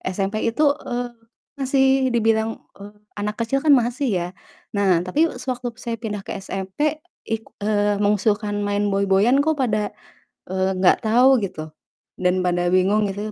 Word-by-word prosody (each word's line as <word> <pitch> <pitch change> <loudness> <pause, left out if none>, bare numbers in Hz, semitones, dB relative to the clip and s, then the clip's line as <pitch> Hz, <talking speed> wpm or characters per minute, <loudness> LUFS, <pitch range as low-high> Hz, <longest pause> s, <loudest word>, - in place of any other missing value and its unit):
SMP 195 +1 -1
itu, 230 +7 0 0.2
eee, 245 0 -2 0.5
masih 265 0 +2 0.3
dibilang, 225 0 +1 0.2
eee, 205 +1 -10 0.3
anak 210 +1 -2
kecil 270 +4 0
kan 300 -2 +6
masih, 245 +2 0 0.2
ya. - - -4 0.5
Nah, 190 -4 +2
tapi 295 - +2
sewaktu 250 -2 -4
saya 235 -2 -3
pindah 210 -3 -4
ke - - -4
SMP, 195 - -3 0.2
ik 225 0 -2 0.2
eee, 205 -1 +1
mengusulkan 205 0 +1
main 205 0 0
boy-boyan 200 +6 +3
kok 315 +1 +1
pada, 215 -5 0 0.6
eee, 190 0 0
enggak 185 +5 +3
tahu 250 +4 +5
gitu, 155 -4 -7 0.5
dan 180 0 +2
pada 175 0 +1
bingung 200 +3 +3
gitu 205 +2 -5
210 Hz, 150 wpm, -22 LUFS, 195-245 Hz, 0.6 s, kan